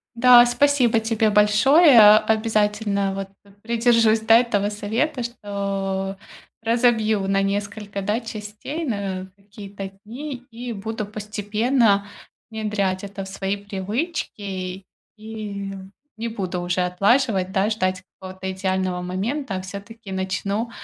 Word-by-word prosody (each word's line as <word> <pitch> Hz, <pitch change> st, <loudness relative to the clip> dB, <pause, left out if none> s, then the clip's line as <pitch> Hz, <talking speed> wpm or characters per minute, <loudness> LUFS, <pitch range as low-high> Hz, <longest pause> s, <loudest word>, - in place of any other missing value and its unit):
Да, 245 Hz, 0 st, +8 dB
спасибо 245 Hz, -2 st, +3 dB
тебе 225 Hz, -1 st, +1 dB
большое. 215 Hz, -, +7 dB
Обязательно, 210 Hz, -2 st, 0 dB
вот, 195 Hz, 0 st, -5 dB
п 200 Hz, -, -20 dB
придержусь, 230 Hz, -1 st, +3 dB
да, 225 Hz, +1 st, +6 dB
этого 205 Hz, -4 st, 0 dB
совета, 230 Hz, +6 st, -2 dB
что 195 Hz, -4 st, -3 dB, 0.4 s
разобью 225 Hz, -3 st, +2 dB
на 195 Hz, 0 st, +2 dB
несколько, 200 Hz, 0 st, -3 dB
да, 210 Hz, +4 st, 0 dB
частей, 220 Hz, +8 st, -6 dB
на 195 Hz, -5 st, -3 dB
какие-то 200 Hz, -1 st, -9 dB
дни 255 Hz, +3 st, -7 dB
и 240 Hz, +1 st, -6 dB
буду 220 Hz, +1 st, -4 dB
постепенно 210 Hz, +1 st, 0 dB, 0.4 s
внедрять 210 Hz, -4 st, -2 dB
это 195 Hz, -1 st, -6 dB
в -, -, -10 dB
свои 195 Hz, +1 st, -3 dB
привычки. 200 Hz, -, -4 dB, 0.3 s
И 210 Hz, -2 st, -6 dB, 0.5 s
не 230 Hz, +1 st, -3 dB
буду 190 Hz, -5 st, -4 dB
уже 175 Hz, +1 st, -1 dB
отлаживать, 195 Hz, +2 st, +2 dB
да, 195 Hz, +1 st, +1 dB
ждать 185 Hz, -3 st, -1 dB, 0.2 s
какого-то 190 Hz, 0 st, -6 dB
идеального 185 Hz, -1 st, -1 dB
момента, 200 Hz, +8 st, -3 dB
а 185 Hz, -, -3 dB
всё-таки 200 Hz, +2 st, -9 dB
начну, 195 Hz, +4 st, -2 dB
210 Hz, 120 wpm, -22 LUFS, 195-225 Hz, 0.5 s, Да